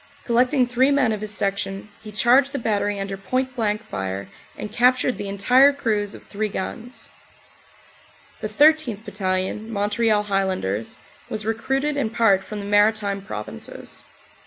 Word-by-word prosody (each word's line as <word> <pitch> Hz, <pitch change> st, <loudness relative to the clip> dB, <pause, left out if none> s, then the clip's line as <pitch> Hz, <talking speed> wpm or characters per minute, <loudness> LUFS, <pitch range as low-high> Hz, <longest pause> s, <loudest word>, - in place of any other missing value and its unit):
Collecting 250 Hz, +2 st, +3 dB
three 250 Hz, +2 st, +2 dB
men 280 Hz, -5 st, +3 dB
of 215 Hz, -1 st, -3 dB
his 215 Hz, -, -3 dB
section 195 Hz, -1 st, -2 dB
he 215 Hz, -, -9 dB
charged 250 Hz, +7 st, +4 dB
the -, -, -1 dB
battery 205 Hz, -4 st, -1 dB
under 195 Hz, 0 st, -3 dB
point 255 Hz, +7 st, -2 dB
blank 215 Hz, -2 st, -1 dB
fire 95 Hz, -, -4 dB, 0.3 s
and 210 Hz, -, -6 dB
captured 250 Hz, +2 st, +3 dB
the 200 Hz, -, -5 dB
entire 250 Hz, +8 st, +5 dB
crews 215 Hz, -7 st, -1 dB
of -, -, -13 dB
three 215 Hz, +1 st, -3 dB
guns. 230 Hz, +6 st, -6 dB, 1.3 s
The 215 Hz, -, -4 dB
13th. 265 Hz, -3 st, +3 dB
Battalion, 190 Hz, +2 st, -2 dB
Montreal 210 Hz, +1 st, +1 dB
Highlanders, 190 Hz, -, -1 dB, 0.3 s
was 215 Hz, -1 st, -4 dB
recruited 270 Hz, +6 st, -1 dB
in 270 Hz, -6 st, 0 dB
part 220 Hz, -4 st, +3 dB
from 210 Hz, -, -7 dB
the -, -, -7 dB
Maritime 205 Hz, -1 st, +2 dB
Provinces. 105 Hz, -, -7 dB
215 Hz, 145 wpm, -23 LUFS, 200-245 Hz, 1.3 s, entire